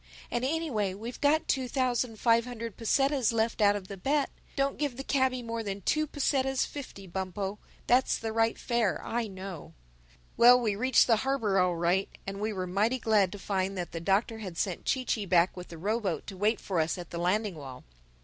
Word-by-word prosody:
And 240 - -1
anyway 260 - -1
we've 230 +5 -7
got 310 +3 +3
two 260 -1 0
thousand 245 -3 -1
five 230 -1 +4
hundred 230 -3 -6
pesetas 270 +2 +2
left 225 0 0
out 205 0 +5
of 195 -2 -5
the 200 - -7
bet. 280 +9 0 0.2
Don't 275 0 0
give 285 -5 -1
the 270 - -4
cabby 260 -3 +1
more 230 0 -3
than 200 -2 -4
two 310 - +1
pesetas 270 -2 +1
fifty, 260 -9 -8
Bumpo. 190 +2 -4 0.3
That's 250 +1 +3
the 225 -1 -4
right 225 0 +2
fare, 235 -6 0
I 235 0 -1
know." 190 -4 -8 0.6
Well, 245 +1 +8
we 220 -4 0
reached 255 +4 +4
the 225 -3 +4
harbor 225 -6 +1
all 180 -1 +2
right 175 +3 +1 0.2
and 195 0 -5
we 215 +1 -1
were 185 -3 -3
mighty 205 +8 +1
glad 215 -6 +2
to - - -6
find 195 -1 -2
that 175 -1 -4
the 165 - -4
Doctor 200 +6 +1
had 185 -6 -7
sent 180 -1 -2
Chee 260 -1 0
Chee 210 -5 -1
back 175 0 +3
with 180 -1 -8
the 170 - -10
row 210 +7 0
boat 185 -9 -3
to 195 - -8
wait 210 +4 +1
for 185 -4 -2
us 160 +3 0
at 175 -2 -8
the 170 - -4
landing 200 +4 +1
wall. 135 -5 -9
220 Hz, 210 wpm, -29 LUFS, 190-250 Hz, 0.6 s, Well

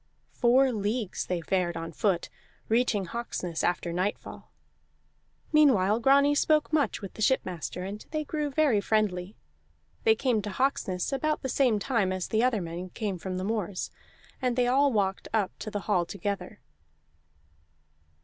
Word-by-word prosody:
Four 255 +2 +4
leagues 215 -1 -2
they 180 -2 -1
fared 175 0 0
on 165 0 -5
foot, 175 +1 0 0.4
reaching 225 -4 +2
Hawksness 180 -5 -4
after 175 -1 0
nightfall. 185 +4 -4 1.0
Meanwhile 230 -9 +5
Grani 280 +4 +5
spoke 305 +1 +2
much 290 -8 +1
with 195 - -7
the - - -9
shipmaster, 185 - 0
and 200 +3 -6
they 310 -1 -2
grew 300 0 -2
very 275 -7 +2
friendly. 200 -3 0 0.7
They 220 - +5
came 235 -2 +1
to 205 - -5
Hawksness 200 -4 -1
about 305 +3 -1
the 265 - -2
same 250 -5 +3
time 210 -3 0
as 185 -1 -3
the 220 +1 +2
other 245 -5 +2
men 170 +2 -6
came 200 -2 -4
from 185 +1 -4
the 185 - -3
moors, 205 -3 -2 0.5
and 250 -2 +1
they 250 0 +2
all 275 +3 +3
walked 195 -4 0
up 205 -4 +1
to 215 - -5
the 205 -1 -3
hall 175 -1 +1
together. 200 0 -4
210 Hz, 155 wpm, -28 LUFS, 185-255 Hz, 1.0 s, Meanwhile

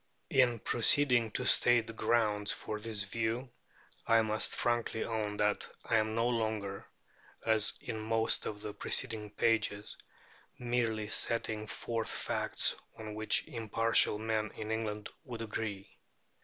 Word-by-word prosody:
In 125 -3 +4
proceeding 120 +1 +3
to 125 - 0
state 120 -2 +5
the 115 - -7
grounds 105 -3 +1
for 105 - -4
this 105 -2 -2
view, 115 +4 -2 0.6
I 115 0 +5
must 110 0 0
frankly 120 -1 0
own 105 -2 -3
that 105 0 0 0.2
I 115 - +2
am 110 0 0
no 115 +1 +2
longer 110 -4 -2 0.6
(as 110 -2 +4
in 110 - -5
most 110 +1 +1
of 105 -1 -6
the 105 -1 -6
preceding 110 -3 -3
pages) 105 -1 0 0.6
merely 115 -3 -1
setting 110 -1 0
forth 115 0 -3
facts - - 0 0.2
on 110 -1 -7
which 110 +1 +2
impartial 115 -4 +2
men 110 0 -1
in 110 0 -5
England 105 -2 -3
would 120 -3 -6
agree. 105 -3 -5
110 Hz, 135 wpm, -32 LUFS, 105-115 Hz, 0.6 s, state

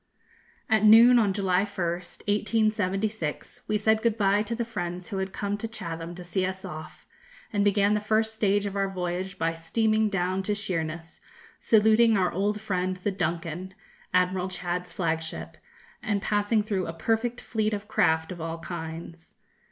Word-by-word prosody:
_ - - -46 0.6
At 220 -1 +3
noon 230 +3 +8
on 210 -3 +3
July 190 -2 +1
1st, 180 -4 -4
1876, 210 -4 -1
we 215 - +1
said 220 +1 +2
good 230 -1 +1
bye 200 0 +3
to 230 +2 -3
the 235 0 -2
friends 180 -5 -5
who 195 - -3
had 190 0 -3
come 205 +1 -3
to 225 - -3
Chatham 170 -6 -6
to 180 - -8
see 180 +2 -1
us 190 0 -3
off, 155 0 -9 0.5
and 205 -1 +2
began 205 0 +3
the 210 - +2
first 220 +1 +1
stage 205 -2 +1
of 200 -1 -4
our 195 -1 0
voyage 185 +1 -3
by 165 0 0
steaming 215 +6 +1
down 185 -1 0
to 205 +2 -1
Sheerness, 165 -4 -4 0.4
saluting 220 +1 +5
our 185 -2 +2
old 205 +3 0
friend 185 -3 -1
the 190 +3 -2
'Duncan,' 175 0 -3 0.4
Admiral 185 0 +2
Chads's 180 0 -3
flagship, 160 -2 -3 0.4
and 205 -3 0
passing 210 +1 +1
through 200 -4 -2
a 165 - -4
perfect 225 +7 -1
fleet 215 -1 -1
of 205 0 -4
craft 160 -5 +2
of 175 -2 -7
all 165 0 -4
kinds. 165 0 -8
195 Hz, 170 wpm, -27 LUFS, 175-215 Hz, 0.6 s, noon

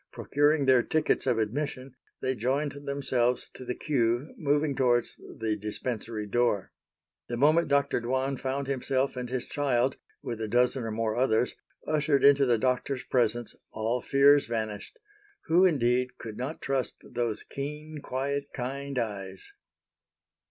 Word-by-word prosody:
Procuring 145 0 +2
their 130 -2 +6
tickets 155 +1 0
of 125 -3 +2
admission 130 +3 -2 0.3
they 130 - +1
joined 135 +5 0
themselves 135 -3 -1
to - - -9
the 125 0 -3
queue 120 -1 0
moving 145 -1 +1
towards 120 -3 +1 0.2
the 110 -1 -1
Dispensary 110 +1 -4
door. 105 -2 0 0.6
The 120 - -3
moment 155 +6 +4
Dr. 140 -3 +2
Dwan 130 +3 0
found 135 +2 -2
himself 135 0 -1
and 125 -1 -4
his 130 -1 -2
child, 135 -2 0 0.3
with 115 -2 -4
a 110 - -2
dozen 125 +2 +2
or - - -2
more 110 0 -1
others, 125 -1 +2 0.3
ushered 150 -2 +2
into 140 -1 +6
the 120 -2 +4
Doctor's 130 +2 0
presence, 120 -2 0 0.2
all 115 +3 -1
fears 140 +1 +5
vanished,—who, 190 - -2
indeed, 125 -6 +2
could 110 -2 -7
not 130 +7 -5
trust 135 -2 -1
those 120 -3 -2
keen, 150 +2 -6
quiet, 140 +2 -2
kind 135 +2 -4
eyes? 100 -5 -4
130 Hz, 140 wpm, -28 LUFS, 120-140 Hz, 0.6 s, their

